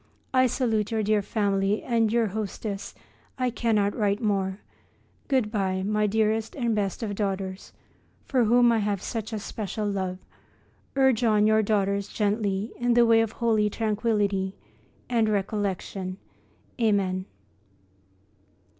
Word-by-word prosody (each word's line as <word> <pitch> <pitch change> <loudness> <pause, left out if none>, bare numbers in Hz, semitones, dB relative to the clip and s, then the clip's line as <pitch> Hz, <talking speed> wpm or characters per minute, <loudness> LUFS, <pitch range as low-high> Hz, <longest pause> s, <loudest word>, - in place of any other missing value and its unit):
I 255 0 +5
salute 220 -4 0
your 220 -1 0
dear 210 0 +2
family 200 0 0
and 230 -3 +1
your 230 -2 +2
hostess. 200 0 -5 0.4
I 255 -1 0
cannot 215 -4 +1
write 205 -2 +1
more. 195 -4 0 0.7
Good 255 -6 +1
bye, 190 -3 -1
my 210 +1 +1
dearest 220 +1 0
and 240 -5 0
best 205 +2 -2
of 210 -2 -2
daughters, 195 -2 -3 0.5
for 255 -4 +2
whom 240 +2 +5
I 230 - +2
have 205 -2 0
such 225 -1 -4
a 220 - -2
special 210 0 -4
love. 190 -2 -2 0.8
Urge 265 -3 +3
on 215 -2 +4
your 220 0 +4
daughters 200 -1 0
gently 205 0 -1
in 240 0 +1
the 240 0 +6
way 225 -1 +5
of 225 -1 -2
holy 220 -3 +2
tranquillity 205 -3 0 0.5
and 230 -3 +2
recollection. 195 -2 -2 0.6
Amen. 195 -4 +1
210 Hz, 135 wpm, -26 LUFS, 200-225 Hz, 0.8 s, the